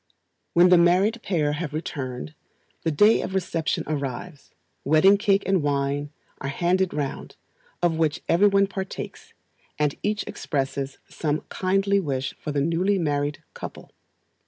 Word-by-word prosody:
When 175 +1 +7
the 180 -1 +7
married 190 +7 +3
pair 160 -8 0
have 150 0 -4
returned, 130 -5 -4
and 155 - -25 0.5
the 165 - 0
day 205 +9 +5
of 190 - -4
reception 170 -4 -1
arrives, 145 +1 -5 0.3
wedding 155 +7 +6
cake 200 -1 +2
and 190 -3 +2
wine 145 0 -1 0.3
are 140 - -4
handed 180 +5 +1
round, 145 -2 -4 0.5
of 165 -2 +2
which 160 -2 0
every 190 +5 +5
one 200 0 +4
partakes, 190 -1 -7 0.4
and 150 -1 +1
each 210 +1 -1
expresses 135 -1 -3
some 155 -1 -2
kindly 195 +1 +1
wish 135 -6 -2
for 150 - -4
the 145 -1 0
newly 175 +6 +1
married 145 -3 -1
couple. - - -9
165 Hz, 145 wpm, -25 LUFS, 145-190 Hz, 0.5 s, When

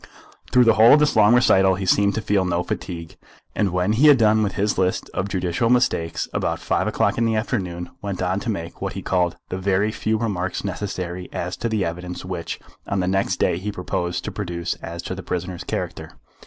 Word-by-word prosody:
Through 125 - +6
the 115 -1 +5
whole 110 +2 +7
of 150 - +7
this 150 -3 +2
long 110 +2 +6
recital 95 -7 +4
he 95 +1 -4
seemed 100 +1 +3
to 110 - -1
feel 105 -2 +1
no 90 -1 0
fatigue, 85 -3 -6 0.4
and 105 - +1
when 90 +3 0
he 135 +8 +5
had 145 -2 +8
done 110 -1 +4
with 100 -3 0
his 105 0 0
list 95 0 0
of 100 - -2
judicial 95 +4 0
mistakes 120 -10 +1
about - - -1
five - - -1
o'clock - - +1
in 115 - +2
the 115 -1 +1
afternoon, 90 -6 -3
went 100 -3 -4
on 95 +1 0
to 115 - -4
make 85 -5 -5
what - - -3
he - - -6
called 90 -2 0
the 90 - -3
very 100 +2 +1
few 110 0 -1
remarks 95 -5 -2
necessary 90 -2 -4
as 90 +1 -3
to 115 - -2
the 110 -3 0
evidence 90 +2 -5
which 90 -2 -5 0.3
on 100 - -1
the 90 - 0
next 95 +1 +1
day 85 - +1
he 105 +3 -3
proposed 90 -2 -3
to - - -3
produce 85 -3 -3
as 85 +1 -6
to - - -4
the 95 - -6
prisoner's 90 -1 -4
character. - - -5
95 Hz, 220 wpm, -22 LUFS, 90-105 Hz, 0.4 s, had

